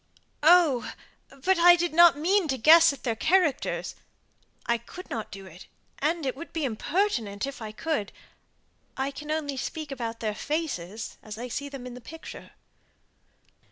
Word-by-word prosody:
"Oh! 315 -5 +4 0.5
but 380 -1 +3
I 350 +1 +8
did 345 -1 -1
not 340 -3 +7
mean 365 +4 +2
to 265 -2 -1
guess 325 +6 +7
at 280 - -10
their 230 -2 -1
characters. 320 +2 +1 0.7
I 235 0 +1
could 360 +10 -12
not 220 -2 -4
do 195 -1 -10
it; 180 0 -13 0.3
and 315 +1 0
it 260 - -1
would 330 +5 -9
be 320 -3 -1
impertinent, 240 - -1
if 275 -3 -8
I 215 -1 -6
could. 215 -3 -3 0.9
I 270 +1 -1
can 300 +2 -9
only 300 -3 -2
speak 310 +2 -5
about 235 -3 -5
their 215 -2 -2
faces 225 - -4
as 215 0 -9
I 245 +2 -6
see 285 +4 -4
them 275 -3 -8
in 250 - -7
the 250 - -10
picture." 325 +7 -11
280 Hz, 165 wpm, -27 LUFS, 230-330 Hz, 0.9 s, I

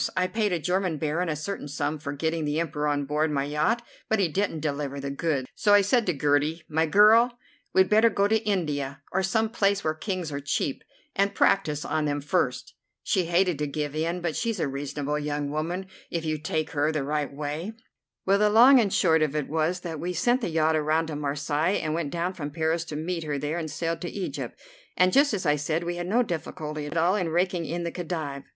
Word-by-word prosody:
I 185 - +3
paid 210 +1 0
a 175 - +1
German 180 0 0
Baron 160 +4 -1
a 155 - -1
certain 155 +1 -5
sum 145 +1 -2
for 140 -1 -5
getting 160 +3 -1
the 150 +1 0
Emperor 150 -2 -1
on 145 -1 0
board 150 +2 0
my 140 -2 0
yacht, 155 +12 0 0.3
but 220 - +3
he 195 -3 +2
didn't 165 -1 -1
deliver 140 -2 -3
the 140 0 -4
goods. 140 -3 -1
So 205 -1 +4
I 205 - +7
said 220 +3 +2
to 180 - +2
Gertie: 150 +3 +1
'My 160 +1 +1
girl, 225 +7 +6 0.3
we'd 190 0 +4
better 220 +2 +5
go 200 -2 +2
to 220 +1 +3
India, 145 -9 -2
or 190 - +1
some 220 +4 +1
place 200 -3 +1
where 155 - +1
Kings 175 0 -4
are 140 - -3
cheap, 140 -1 -2 0.3
and 200 +1 +1
practise 150 -7 +2
on 155 0 0
them 145 -1 0
first.' 145 -3 -1 0.3
She 185 - +1
hated 175 -2 +2
to 150 - -1
give 145 0 -3
in, 165 +3 -1
but 170 -3 -2
she's 230 -4 -1
a 155 - +1
reasonable 145 +2 -3
young 145 -1 -2
woman 170 +5 -2 0.2
if 165 -1 -3
you 155 -1 -1
take 155 0 -2
her 150 +1 +1
the 155 -3 -1
right 150 +1 -1
way. 150 +8 -4 0.5
Well, 195 +1 +3
the 210 0 +4
long 245 +5 +8
and 215 -4 +2
the - - -1
short 160 -3 +4
of 155 -1 0
it 150 -2 -1
was 160 +4 0
that 165 -4 -5
we 180 +3 -3
sent 240 +9 +2
the 225 - -1
yacht 160 -1 +2
around 155 +1 +1
to 155 - -4
Marseilles, 145 +4 0
and 155 0 -2
went 160 -3 -2
down 175 +4 -2
from 145 -5 -5
Paris 160 +2 0
to 155 - -6
meet 165 +2 -3
her 150 -2 -2
there, 150 +4 -2
and 160 -2 -4
sailed 165 +2 -3
to 175 - -3
Egypt, 195 -2 -5 0.4
and, 185 0 +4
just 285 +1 +5
as 195 -5 -2
I 150 -1 +3
said, 155 +3 -1
we 175 0 -3
had 175 0 -4
no 235 +6 +3
difficulty 155 -5 -5
at 155 - -4
all 175 +4 +3
in 180 -5 -1
raking 175 0 0
in 170 +2 -3
the 170 - -3
Khedive. 155 -6 -4
160 Hz, 230 wpm, -26 LUFS, 150-185 Hz, 0.5 s, long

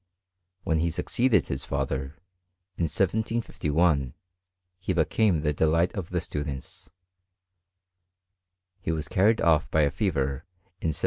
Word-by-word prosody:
When 80 -1 +1
he 85 +1 +1
succeeded 120 +8 +2
his 65 0 -3
fatlier, 70 +1 -3 0.6
in 85 - 0
1751, 85 - 0 0.6
he 95 0 -1
became 85 +1 +2
the 75 -1 +1
delight 80 +4 +2
of 95 -5 -5
the 90 - 0
students. 75 -5 -6 1.9
He 80 - -1
wai 80 -2 -2
carried 105 +4 +3
off 80 -2 +3
by 80 - +3
a 70 -1 +3
fever 70 -7 -1 0.4
in - - -1
1757. 80 - +1
80 Hz, 125 wpm, -27 LUFS, 75-90 Hz, 1.9 s, carried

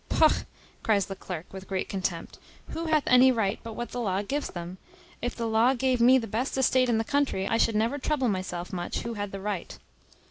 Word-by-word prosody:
"Pogh!" 315 -1 +3 0.3
cries 205 -3 +2
the 195 - -6
clerk, 180 -3 -7
with 190 0 -8
great 190 -1 -2
contempt, 185 -3 -4 0.3
"who 330 +1 -4
hath 310 -2 +2
any 250 +1 +6
right 220 -5 0
but 230 -1 -7
what 240 +2 -5
the 245 - -4
law 195 -2 0
gives 285 +8 -2
them? 175 +1 -7 0.4
If 245 - -2
the 230 - -3
law 225 +4 +3
gave 255 -1 +1
me 255 +2 +7
the 235 - -2
best 230 +6 -2
estate 255 -1 +3
in 230 - +3
the 225 - +1
country, 275 -7 0
I 225 - +1
should 225 - +2
never 230 +7 +1
trouble 275 -2 0
myself 185 -3 -3
much 175 -1 -3
who 235 - -4
had 205 -2 -4
the 195 - -6
right." 200 -3 -4
225 Hz, 220 wpm, -27 LUFS, 195-255 Hz, 0.4 s, me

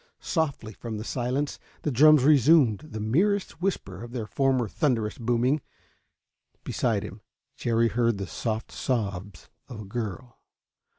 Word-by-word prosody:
Softly, 140 - -2
from 110 +1 -6
the 105 - -5
silence, 130 +5 -2 0.2
the 150 - 0
drums 150 +2 +6
resumed 140 -5 +5
the 150 -8 -8
merest 180 - 0
whisper 105 - -2
of 120 0 -9
their 120 -4 -3
former 130 0 +1
thunderous 115 -3 -1
booming. 125 +5 +1 1.0
Beside - - 0
him. - - -9 0.3
Jerry 115 0 +1
heard 115 -2 +1
the 100 - -3
soft 110 +4 -4
sobs 100 -7 -3 0.2
of 120 - -8
a 105 - -7
girl. 120 +3 -6
120 Hz, 135 wpm, -26 LUFS, 110-140 Hz, 1.0 s, drums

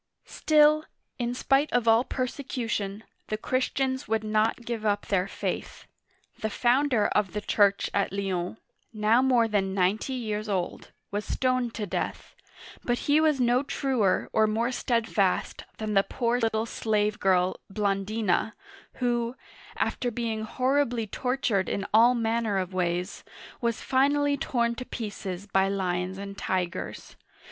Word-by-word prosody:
Still, 305 0 +4 0.3
in 240 0 -1
spite 275 +3 +2
of 240 -1 +1
all 225 +2 +6
persecution, 235 -6 -3 0.2
the 215 - -2
Christians 260 +2 -1
would 220 0 0
not 215 +2 0
give 230 -2 -3
up 205 -1 0
their 190 -1 +1
faith. - - -4 0.5
The 220 - -1
founder 245 0 +2
of 205 -4 0
the 210 - -2
church 200 -1 +3
at 200 - +1
Lyons, 190 -1 -2 0.3
now 220 +2 +3
more 250 -3 +3
than 195 -3 0
ninety 200 +7 +1
years 215 -3 -3
old, 185 -3 -3 0.2
was 205 +1 -2
stoned 255 -2 0
to 210 - -2
death; 190 - -4 0.5
but 240 0 0
he 295 +2 +4
was 305 -3 +3
no 245 +1 +3
truer 255 -9 0
or 220 0 +4
more 230 +4 0
steadfast 225 -6 0
than 215 -1 -3
the 195 - +5
poor 235 +4 -1
little 225 -1 0
slave 210 -2 0
girl 185 -1 +2
Blandi'na, 205 0 0 0.4
who, 240 -1 -1 0.4
after 245 - 0
being 225 -2 -3
horribly 255 -1 +1
tortured 235 -3 -1
in 200 - -2
all 235 +3 +6
man 230 0 0
ner 205 -3 0
of 185 0 -2
ways, 180 0 -2 0.4
was 235 -2 -1
finally 285 +2 +2
torn 235 -4 0
to 255 - -6
pieces 200 -6 -6
by 195 -1 +2
lions 185 -1 -2
and 200 0 -7
tigers. 180 -2 -3
220 Hz, 145 wpm, -27 LUFS, 200-245 Hz, 0.5 s, all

